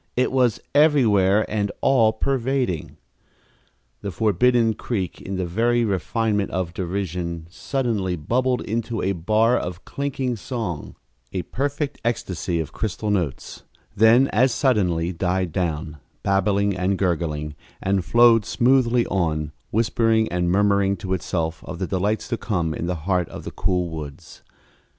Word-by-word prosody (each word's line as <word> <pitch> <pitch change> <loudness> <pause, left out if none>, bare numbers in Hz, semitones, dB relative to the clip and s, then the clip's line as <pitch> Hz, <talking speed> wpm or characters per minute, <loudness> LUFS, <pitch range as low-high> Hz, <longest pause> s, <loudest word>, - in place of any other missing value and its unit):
It 125 - +1
was 125 -3 +2
everywhere 110 -10 +4
and 105 -1 -1
all 115 -5 +4
pervading. 125 - -1 1.0
The 100 - -4
forbidden 110 +4 +2
creek, 100 -5 -4
in 95 - -5
the 95 -1 -1
very 115 +6 +1
refinement 105 +2 0
of 90 -2 -3
derision, 90 -3 -3
suddenly 110 -6 -1
bubbled 125 - 0
into 115 +1 -3
a 95 - +1
bar 110 +6 +2
of 90 +1 -4
clinking 135 -3 -2
song 110 - -5 0.4
a 90 -2 -3
perfect 145 +2 -3
ecstasy 90 -7 -2
of 80 - -4
crystal 105 0 -2
notes 85 -9 -2 0.3
then 115 +5 +6
as 130 +4 +3
suddenly 90 - +1
died 90 0 -1
down, 80 -3 -2 0.3
babbling 100 0 +2
and 95 +1 0
gurgling, 80 -5 -1 0.3
and 95 -1 0
flowed 115 +4 +5
smoothly 120 +1 +3
on, 75 -5 -1 0.2
whispering 110 0 +2
and 90 0 0
murmuring 100 0 +2
to 95 +1 -3
itself 80 -3 -2
of 85 - -6
the 95 - -2
delights 100 +4 -1
to 120 - -1
come 85 -9 -1
in 85 - -4
the 90 - -1
heart 90 -3 +1
of - - -8
the - - -6
cool 90 -2 0
woods. 75 0 -9
100 Hz, 140 wpm, -23 LUFS, 90-115 Hz, 1.0 s, then